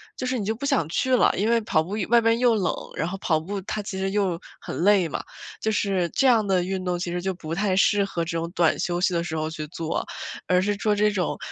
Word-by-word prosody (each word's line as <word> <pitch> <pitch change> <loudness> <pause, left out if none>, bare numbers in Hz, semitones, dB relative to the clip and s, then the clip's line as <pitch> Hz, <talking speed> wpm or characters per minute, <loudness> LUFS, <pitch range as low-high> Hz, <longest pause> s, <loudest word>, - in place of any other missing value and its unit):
就 - - -4
是 255 0 0
你 205 - -3
就 220 +2 -1
不 245 - -5
想 165 - +1
去 255 +9 +2
了， - - +4
因 210 +4 +1
为 235 0 +4
跑 180 -7 +1
步 175 - -9 0.2
外 235 0 +6
边 230 0 +3
又 240 -2 +4
冷， 190 -4 +1 0.2
然 160 - -1
后 190 +2 -4
跑 160 -4 +1
步 195 +5 -4
它 210 +3 -4
其 195 -2 -6
实 190 0 -1
又 195 -5 0 0.2
很 - - -6
累 200 -3 +5
嘛， - - -4 0.4
就 220 - 0
是 195 -4 +1
这 270 - 0
样 230 -4 +4
的 190 -3 +2
运 190 +1 -3
动 180 -1 0
其 175 0 -3
实 175 0 -2
就 190 +1 -1
不 165 -3 -6
太 195 +1 +1
适 200 +1 +3
合 170 -4 -2
这 165 0 -3
种 165 +1 -3
短 170 -2 +2
休 175 0 -1
息 185 0 +2
的 170 - +1
时 160 -2 -4
候 155 0 -1
去 155 -1 -6
做， 165 +1 -3 0.4
而 180 0 +3
是 205 +1 0
做 210 0 +1
这 210 +1 +3
种 185 -3 -1
190 Hz, 290 characters per minute, -24 LUFS, 175-210 Hz, 0.4 s, 外